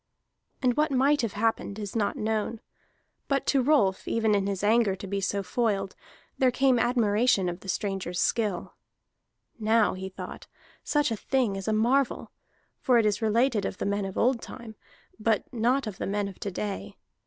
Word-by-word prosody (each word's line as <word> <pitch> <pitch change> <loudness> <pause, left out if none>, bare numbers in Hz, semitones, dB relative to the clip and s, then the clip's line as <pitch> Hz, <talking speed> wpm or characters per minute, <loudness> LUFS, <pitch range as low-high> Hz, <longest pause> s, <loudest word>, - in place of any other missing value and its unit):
And 250 -1 +3
what 305 +1 +3
might 275 +2 +3
have 230 -5 -2
happened 215 -1 -1
is 205 -1 -6
not 210 -3 0
known. 220 +1 -1 0.7
But 275 -1 0
to 275 - +3
Rolf, 245 -9 +2
even 225 -2 +1
in 200 -1 +1
his 200 -1 -3
anger 215 -2 +3
to 195 - -8
be 200 +1 -2
so 200 +1 -1
foiled, 195 -1 -1 0.4
there 260 - +5
came 260 0 +3
admiration 230 -3 +2
of 175 +1 -4
the 195 - -10
stranger's 190 -3 -2
skill. 210 -6 0 0.9
"Now," 220 0 +3
he 190 +1 -6
thought, 190 - -9 0.4
"such 295 -4 +1
a - - 0
thing 240 -2 0
is 195 +1 -6
a - - +2
marvel, 240 +5 +1 0.5
for 250 -3 +3
it 230 - +3
is 210 +1 +1
related 225 0 +2
of 190 - -3
the - - -3
men 200 0 0
of 195 - -6
old 240 0 +2
time, 235 -3 -9 0.5
but 220 -1 +1
not 245 +4 +1
of 210 -3 -6
the - - -2
men 205 +1 -1
of 195 - -10
to 200 - -3
day. 195 +1 -5
220 Hz, 185 wpm, -27 LUFS, 200-245 Hz, 0.9 s, there